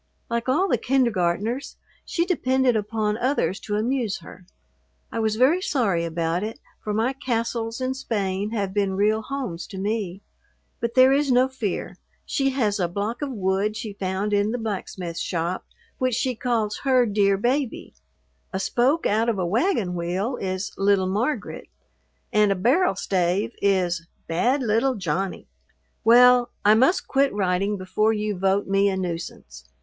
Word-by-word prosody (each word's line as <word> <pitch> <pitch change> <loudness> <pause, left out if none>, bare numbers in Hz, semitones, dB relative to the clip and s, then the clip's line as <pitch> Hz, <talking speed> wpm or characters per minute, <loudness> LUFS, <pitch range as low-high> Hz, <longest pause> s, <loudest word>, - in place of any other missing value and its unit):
Like 235 +2 -1
all 340 +9 +3
the - - +1
kindergartners, 235 -2 0 0.3
she 340 - -1
depended 260 -8 +2
upon 215 0 -1
others 250 -6 0
to 205 - -4
amuse 225 -1 0
her. 180 - -13 0.6
I - - -3
was 220 -1 +1
very 275 +10 +3
sorry 200 - 0
about 165 +1 -1
it, 220 +2 -5 0.2
for 210 - -3
my 225 +5 +1
castles 230 -3 -2
in 260 0 -1
Spain 205 -6 -2
have 200 -4 -2
been 200 -2 0
real 215 +3 +2
homes 245 -9 -5
to 195 - -9
me. 200 -1 -3 0.6
But 235 0 -3
there 260 +1 +7
is 280 -1 +2
no 250 +1 +4
fear. 240 -8 -4 0.3
She 270 -4 0
has 220 -6 0
a 175 - +1
block 205 - -3
of 290 - -2
wood 200 0 0
she 210 -2 -5
found 195 +2 -2
in 205 +1 +2
the 240 - -1
blacksmith 190 -6 -4
shop 170 +1 -2 0.3
which 255 -2 +1
she 255 +1 0
calls 225 -3 -1
her 260 -3 +3
"dear 200 -2 +2
baby." 250 +4 -1 0.6
A 190 - -2
spoke 255 +10 +1
out 225 +3 +2
of 225 - 0
a 185 - 0
wagon 220 - +1
wheel 180 +8 -2
is 185 0 -3
"little 195 -1 +3
Margaret," 215 +11 -2 0.7
and 210 -1 +4
a - - +2
barrel 260 - +2
stave 185 +2 0
is 180 -4 +1 0.2
"bad 245 +12 +1
little 235 +4 +2
Johnny." 185 0 -3 0.6
Well, 245 +2 +6 0.2
I 210 - +7
must 260 +11 +3
quit 275 0 +2
writing 195 +1 0
before 215 +4 +1
you 210 -1 -2
vote 195 +2 +1
me 195 +1 +2
a 190 - -2
nuisance. 170 - -6
215 Hz, 160 wpm, -24 LUFS, 190-250 Hz, 0.7 s, there